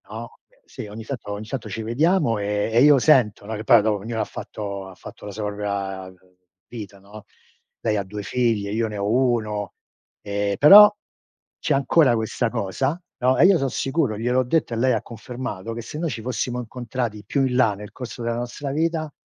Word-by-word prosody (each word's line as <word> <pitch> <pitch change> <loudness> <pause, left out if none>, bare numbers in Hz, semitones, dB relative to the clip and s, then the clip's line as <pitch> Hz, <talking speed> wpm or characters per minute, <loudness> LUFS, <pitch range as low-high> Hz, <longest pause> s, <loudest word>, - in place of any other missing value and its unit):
No, 115 +2 -7 0.3
sì, - - -9
ogni 105 +2 -8
tanto 115 -3 -6
ogni 105 +1 -6
tanto 115 -2 -5
ci 110 +3 -5
vediamo, 145 - +2
ehm, 105 +2 -1
e 120 - +5
io 145 0 +7
sento, 120 -8 +3
no 110 - -5
che 105 - -6
poi 105 - +6
dopo 105 0 +1
ognuno 110 +2 -3
ha - - +1
fatto 100 -2 -7
ha 95 - -12
fatto 90 - -12
la 105 - -6
sua 105 +1 -5
propria 100 -2 -4 0.6
vita, 105 -4 -9
no, 100 +2 -13 0.6
lei 105 - 0
ha 100 - -1
2 100 +2 -7
figlie, 110 -3 0
io 110 +1 0
ne 105 -1 -6
ho 100 0 -2
1, 110 -5 0 0.5
ehm, 100 0 -2
però 205 +7 +9 0.7
c'è 150 - 0
ancora 140 -1 +3
questa 110 +1 -1
cosa, 125 - -2 0.2
no, 130 +1 +2
e - - +6
io 190 -1 +6
son 135 - 0
sicuro, 135 -5 -1
gliel'ho 125 +3 +1
detto 130 0 0
e - - -2
lei 130 +2 +2
ha 110 - 0
confermato, 115 -3 -6
che 115 - -5
se 150 +6 -8
noi 165 0 -1
ci 120 - -5
fossimo 125 0 -2
incontrati 120 -2 -4
più 135 +6 +1
in 125 -1 -1
là 120 -5 +4
nel 105 +1 -10
corso 125 -1 -8
della 115 0 -1
nostra 120 +4 -5
vita, 160 +1 -1
115 Hz, 205 wpm, -23 LUFS, 105-130 Hz, 0.7 s, però